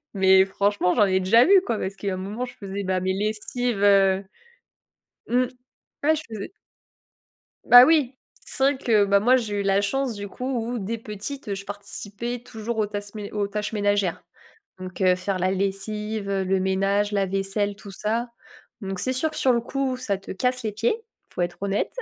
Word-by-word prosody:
Mais 190 0 +6
franchement, 200 -1 +1
j'en 215 - +5
ai 190 -1 +2
déjà 225 +6 +5
vu, 390 +4 +6
quoi. 230 -3 -1
Parce 195 +1 -4
qu'il 200 - -4
y - - 0
a - - -2
un - - -4
moment, 205 +6 -4
je 245 - -12
faisais, 200 0 -6
bah, 185 0 0
mes 185 +1 0
lessives, 215 +2 -2
heu, 195 -1 +4 1.1
mmh. 250 +2 +3 0.6
Ouais, 315 +2 +4
je 310 - -4
faisais 215 -3 -6 1.1
Bah 245 0 +10
oui. 290 -4 +3 0.3
C'est - - -4
vrai 275 -1 +3
que, 220 -5 +3
bah, 200 0 +3
moi 250 +4 +5
j'ai 210 -5 -2
eu - - 0
la 195 0 +2
chance 265 +4 -1
du 205 -1 -6
coup 250 - -6
où, 240 -2 -2
dès 220 +3 -3
petite, 220 +4 -7
heu, 200 - -1
je 195 0 -8
participais 205 +3 -6
toujours 230 -1 -6
aux 215 - +2
tasses 205 0 -6
mé 205 -2 -6
aux 205 -1 -1
tâches 210 +2 -4
ménagères, 205 -3 0 0.6
donc 185 0 -8
heu, 185 -2 +4
faire 185 +1 -3
la 185 +1 +1
lessive, 200 +2 -3
heu, 195 -1 0
le 190 0 +1
ménage, 195 +2 +1
la 200 -1 +2
vaisselle, 195 +2 -1
tout 200 - -11
ça, 220 +5 -2 0.5
donc 195 -1 -4
c'est 255 +6 0
sûr 290 +5 0
que - - -8
sur 255 - +3
le 235 - +1
coup, 265 +1 -2
ça 220 -6 -2
te 195 - -10
casse 250 +5 -1
les 215 -2 -2
pieds, 225 +3 +1
il 450 0 -30
faut - - -2
être 175 0 -2
honnête. 200 0 -1
205 Hz, 210 wpm, -24 LUFS, 195-235 Hz, 1.1 s, Bah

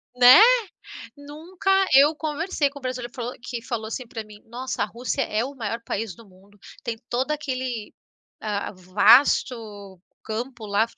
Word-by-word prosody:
Né? 250 +5 +9 0.8
Nunca 315 +7 -5 0.2
eu 285 +3 +7
conversei 310 0 -1
com 285 - -11
um - - -20
brasileiro 250 -2 -5
falou 245 0 -4
que 235 0 -6
falou 235 -4 -4
assim 245 +3 -6
para 225 -1 -7
mim: 210 0 -15
"Nossa, 245 0 -4
a 205 - 0
Rússia 245 +5 -3
é 220 -1 -1
o 275 +2 -7
maior 230 -2 -4
país 215 -4 -4
do 225 +3 -17
mundo, 195 +2 -22 0.2
tem 230 -2 -4
todo 255 +4 -1
aquele, 255 -6 -4 0.5
ah, 205 -2 -3
vasto 205 0 +2 0.3
campo 235 +1 -5
lá, 205 +2 +2
240 Hz, 160 wpm, -24 LUFS, 215-265 Hz, 0.8 s, Né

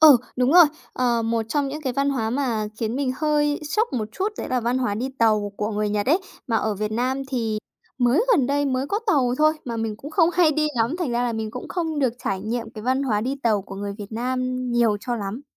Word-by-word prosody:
Ừ, 305 -5 +10 0.2
đúng 255 +3 +2
rồi, 350 -1 +10 0.3
ờ, 240 -2 +1
một 225 0 0
trong 285 +1 0
những 300 +2 -6
cái 260 -3 -1
văn 275 +2 +1
hóa 225 -5 -1
mà 235 -5 -1
khiến 230 +2 -2
mình 270 -2 0
hơi 295 0 +1
sốc 440 - +1
một 220 -4 -2
chút 390 +2 -1
đấy - - -4
là 255 -1 +1
văn 240 +3 0
hóa 210 -6 0
đi 250 +5 -2
tàu 215 -3 +2
của 210 +1 -2
người 210 0 -1
Nhật 205 +2 -1
ấy. 320 +7 +4 0.3
Mà 230 -2 +1
ở 215 -1 0
Việt 210 +2 -3
Nam 260 +4 0
thì 225 -5 -1 0.4
mới 255 - +3
gần 280 - +3
đây 285 +1 +1
mới 265 0 0
có 410 - 0
tàu 260 -10 +3
thôi, 310 0 +5
mà 235 -2 -4
mình 225 -2 -2
cũng 285 +7 -9
không 330 0 +4
hay 345 -4 +4
đi 305 +1 +1
lắm, 235 +9 +1
thành 335 -9 -1
ra 240 +1 0
là 240 -1 0
mình 220 -1 -3
cũng 250 - -7
không 325 -4 -2
được 260 -5 +2
trải 190 -1 -1
nghiệm 225 +1 -3
cái 215 -1 -9
văn 260 +3 +1
hóa 220 -6 +1
đi 255 +5 -1
tàu 215 -4 +2
của 195 - -9
người 200 +1 -4
Việt 205 +1 -8
Nam 255 +2 -1 0.2
nhiều 230 -3 +3
cho 245 -1 -2
lắm. 210 +4 -5
245 Hz, 260 wpm, -23 LUFS, 220-280 Hz, 0.4 s, Ừ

